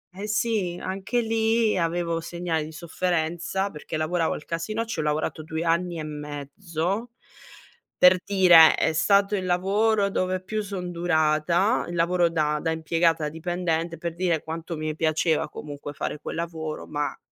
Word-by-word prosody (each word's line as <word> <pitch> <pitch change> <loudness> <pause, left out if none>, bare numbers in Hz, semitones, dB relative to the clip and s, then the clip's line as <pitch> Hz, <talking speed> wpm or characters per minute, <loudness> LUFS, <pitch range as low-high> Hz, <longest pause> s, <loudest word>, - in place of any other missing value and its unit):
eh 200 +2 -5
sì, 215 -5 0
anche 195 +6 -1
lì 225 -1 +1
avevo 170 -1 0
segnali 165 -1 -3
di 155 - -9
sofferenza 170 +3 -2
perché 150 -2 -7
lavoravo 160 +2 0
al 150 - -7
casinò, 215 +8 -3
ci 225 - -5
ho - - -3
lavorato 150 +1 -1
2 160 +1 -4
anni 170 +1 0
e - - -4
mezzo, 155 - -4 0.9
per 180 0 +7
dire 180 -5 +7
è - - +1
stato 200 +5 +3
il 190 -2 -2
lavoro 200 +3 +2
dove 185 -1 -1
più 215 +3 -2
son 190 -3 -5
durata, 170 +4 +2
il 175 - -5
lavoro 170 +1 +2
da 150 -2 0
da - - -1
impiegata, 160 0 +1
dipendente, 165 0 -2
per 170 0 -4
dire 170 -3 0
quanto 165 +1 -5
mi 155 0 -3
piaceva 160 0 +1
comunque 145 -1 -7
fare 150 - -4
quel - - -5
lavoro 160 -2 -4
ma 145 0 -3
170 Hz, 155 wpm, -25 LUFS, 160-190 Hz, 0.9 s, per